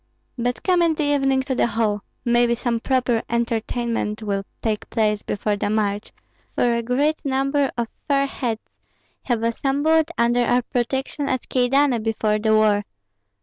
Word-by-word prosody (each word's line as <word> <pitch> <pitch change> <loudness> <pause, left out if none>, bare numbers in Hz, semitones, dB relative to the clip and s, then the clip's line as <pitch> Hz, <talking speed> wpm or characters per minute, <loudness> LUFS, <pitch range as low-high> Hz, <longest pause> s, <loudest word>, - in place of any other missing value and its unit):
But 245 -1 -2
come 360 -2 +3
in 330 -2 +3
the 305 - -1
evening 270 -2 +2
to 260 - -2
the 250 - +2
hall; 215 -3 0 0.2
maybe 240 0 +3
some 235 -1 -1
proper 250 -2 +1
entertainment 230 -1 -1
will 200 -2 -1 0.2
take 215 -2 -2
place 210 -2 +1
before 205 0 -2
the 205 - -1
march, 210 -1 -1 0.4
for 240 -1 +2
a 235 - 0
great 280 +6 0
number 275 +1 +1
of 235 -1 -1 0.2
fair 275 -1 +3
heads 240 -5 -3 0.6
have 235 -3 0
assembled 285 +7 +2
under 240 +1 +3
our 245 +1 +2
protection 265 +3 -2
at 255 - -2
Kyedani 255 0 +3
before 215 -1 0
the 220 0 +3
war. 210 -1 +3
240 Hz, 155 wpm, -22 LUFS, 220-270 Hz, 0.6 s, come